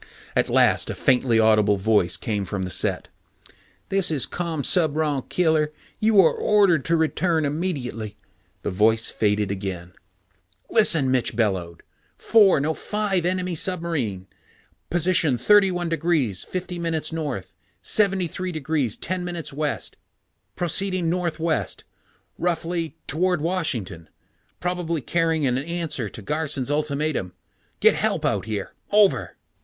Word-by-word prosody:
At - - +2
last - - +3
a - - -3
faintly 125 -3 +2
audible 110 -2 +4
voice 95 -3 +2
came 105 -3 -2
from 95 0 -4
the 90 - -3
set. - - -1 0.4
"... - - -31
this 195 -2 +2
is 150 -5 0
Commsubron 155 -3 -1
Killer. 160 -3 +2 0.3
You 215 -1 +4
are 165 - +4
ordered 195 -8 +3
to 165 0 +2
return 160 0 +1
immediately...." 140 - -3 0.5
The - - -2
voice 110 +4 +2
faded 105 -2 0
again. 95 -3 -5 0.8
"Listen!" 160 - +5
Mitch 125 -3 +1
bellowed. 95 -7 -1 0.3
"Four, 205 -8 +5
no 155 +3 0
five 195 -2 -1
enemy 185 0 -1
submarine 160 - -2 0.6
position 170 -6 +2
31°50´ 170 - 0
North, 145 - -4 0.3
73°10´ 175 - -1
West, 150 +1 -3 0.6
proceeding 180 0 0
northwest 170 -2 -2 0.6
roughly, 170 -1 -2
toward 180 +3 0
Washington. 130 - -3 0.5
Probably 175 -3 -2
carrying 165 +2 0
an 125 -1 +1
answer 155 - -3
to 110 - -10
Garson's 150 -1 -2
ultimatum. 145 -9 -1 0.5
Get - - +5
help - - 0
out - - 0
here. 105 -3 -4 0.2
Over." 205 -1 +3
160 Hz, 110 wpm, -23 LUFS, 120-175 Hz, 0.8 s, Listen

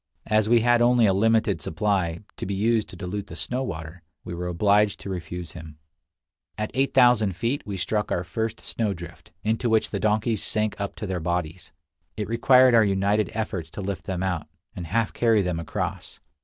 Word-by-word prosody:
As 110 0 +2
we 120 -1 +5
had 120 0 +4
only 120 -1 +5
a 100 - +4
limited 110 -3 +2
supply, 85 0 -1 0.2
to - - -5
be 100 - -2
used 110 +2 +1
to - - -10
dilute 100 +2 -5
the 80 - -9
snow 120 - -2
water, 80 -6 -6 0.2
we - - -6
were 90 +1 -4
obliged 100 +4 +2
to 100 - -5
refuse 90 -1 -6
him. 80 -3 -10 0.8
At 105 0 -3
8000 120 -6 +4
feet 120 +8 -1
we 100 -2 -4
struck 105 +4 -1
our 85 - 0
first 110 +5 -3
snowdrift, 90 -6 -4
into 110 +3 0
which 110 -1 +2
the 100 - -2
donkeys 110 +1 +1
sank 110 -2 -1
up 100 - -4
to 110 - -5
their 95 -2 -2
bodies. 85 0 -3 0.5
It 105 - -2
required 125 +3 +5
our 115 -1 +6
united 100 +1 +1
efforts 100 -7 -3
to 100 - -7
lift 95 -2 -4
them 95 -1 -3
out, 90 -5 -2 0.3
and 90 -4 -6
half 110 +5 0
carry 115 -4 +3
them 90 -2 -2
across. 85 - -4
100 Hz, 190 wpm, -25 LUFS, 90-110 Hz, 0.8 s, our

